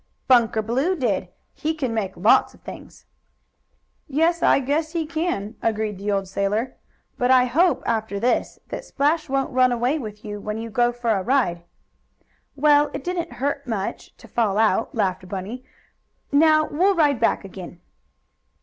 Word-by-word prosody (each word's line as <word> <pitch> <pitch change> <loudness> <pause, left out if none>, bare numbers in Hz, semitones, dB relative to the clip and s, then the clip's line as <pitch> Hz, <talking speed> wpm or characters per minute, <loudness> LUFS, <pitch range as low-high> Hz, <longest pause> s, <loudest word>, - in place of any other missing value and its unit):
"Bunker 230 -3 +4
Blue 265 - 0
did. 215 - -1 0.3
He 315 +1 -2
can 260 -7 -2
make 200 -4 -3
lots 210 +6 +4
of - - -23
things." - - -11 1.0
"Yes, 325 +4 +1
I - - +5
guess 300 +4 -1
he 330 -2 -1
can," 315 - -2
agreed 215 -3 -1
the 205 +1 -2
old 195 -1 -1
sailor. 200 +6 -1 0.4
"But 245 - +1
I 255 -1 +6
hope, 330 +8 +2
after 220 -3 -1
this, 245 +4 0
that - - -5
Splash 300 +2 0
won't 270 0 0
run 255 0 +4
away 245 +6 0
with 210 -4 -8
you 205 -1 -5
when 210 +1 -4
you 225 0 -6
go 240 +2 +2
for 240 -1 -2
a 200 -3 +1
ride." 215 -7 +1 0.9
"Well, 295 +1 +4
it - - -5
didn't 355 -1 -3
hurt 280 +1 -3
much, 210 -5 -4
to - - -15
fall 215 -4 0
out," 220 -3 +1
laughed 185 -1 -1
Bunny. 200 +7 -5 0.7
"Now 310 +1 +5
we'll 375 +7 +2
ride 290 -7 +3
back 225 - +1
again." 180 -2 -10
245 Hz, 165 wpm, -23 LUFS, 210-290 Hz, 1.0 s, I